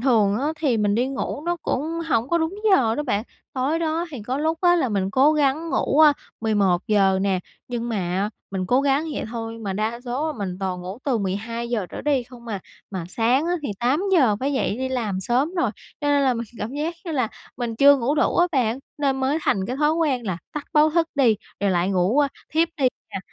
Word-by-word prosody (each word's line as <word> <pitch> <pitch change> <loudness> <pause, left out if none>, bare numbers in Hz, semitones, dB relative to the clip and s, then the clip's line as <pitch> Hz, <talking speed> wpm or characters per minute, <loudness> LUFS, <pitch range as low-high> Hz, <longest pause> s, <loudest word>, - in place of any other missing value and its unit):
thường 220 -5 +3
á 275 - -1
thì 275 -7 +2
mình 205 -1 +2
đi 240 +4 +2
ngủ 275 +1 -4
nó 345 0 +1
cũng 260 - -1 0.3
hổng 230 -3 +1
có 340 - +2
đúng 320 +3 -1 0.2
giờ 230 -11 +4
đó 295 - -2
bạn, 215 -7 0 0.3
tối 275 +5 0
đó 330 +1 -1
thì 255 -8 -7
có 255 +5 -2
lúc 320 +2 0
á 350 -1 +5
là 265 - +1
mình 195 -3 -1
cố 270 +7 +5
gắng 305 +2 +1
ngủ, 280 - +1
à, 305 -2 +8 0.3
11:00 195 -2 +2
nè, 195 -2 +1 0.3
nhưng 240 -1 -3
mà 195 -2 -1 0.2
mình 190 -1 -2
cố 250 +6 +3
gắng 280 +2 +2
vậy - - -3
thôi 230 -1 -5
mà 205 -4 -3
đa 220 +4 -2
số 275 +6 -2
mình 195 -8 -4
toàn 185 -2 -2
ngủ 185 +4 -7
từ 260 -5 +1
12:00 220 +2 -2
trở - - -6
đi 285 -4 +2
không 240 -1 -14
à. 210 -4 -4 0.3
Mà 190 -4 -4
sáng 240 - +2
á 350 - +1
thì - - -3
8:00 275 - +3
phải 275 +2 0
dậy 265 -6 0
đi 260 0 -1
làm 225 -7 -2
sớm 255 - 0
rồi, 260 - +1 0.3
cho 295 - -2
nên 285 -1 +3
là 260 -2 +3
mình 235 0 -4
cảm 215 +4 -4
giác 310 +4 -2
như 335 - -4
là 255 -6 +1 0.3
mình 235 -2 -3
chưa 280 +3 +7
ngủ 265 +2 0
đủ 305 - +1
á 350 - +5
bạn, 245 -4 +1 0.2
nên 275 -2 +1
mới 270 +4 +1
thành 190 -8 +1
cái 250 - -3
thói 300 +2 +3
quen 290 -8 0
là 185 -3 -2
tắt 300 - -4
báo 305 0 +5
thức 330 0 +2
đi, 250 -7 +4 0.2
rồi 200 -1 +2
lại 180 +1 +1
ngủ, 190 +7 +2
a, 290 -1 +4 0.2
thiếp 325 +2 +3
đi 270 -4 +3 0.2
nè. - - -2
250 Hz, 230 wpm, -23 LUFS, 210-295 Hz, 0.3 s, à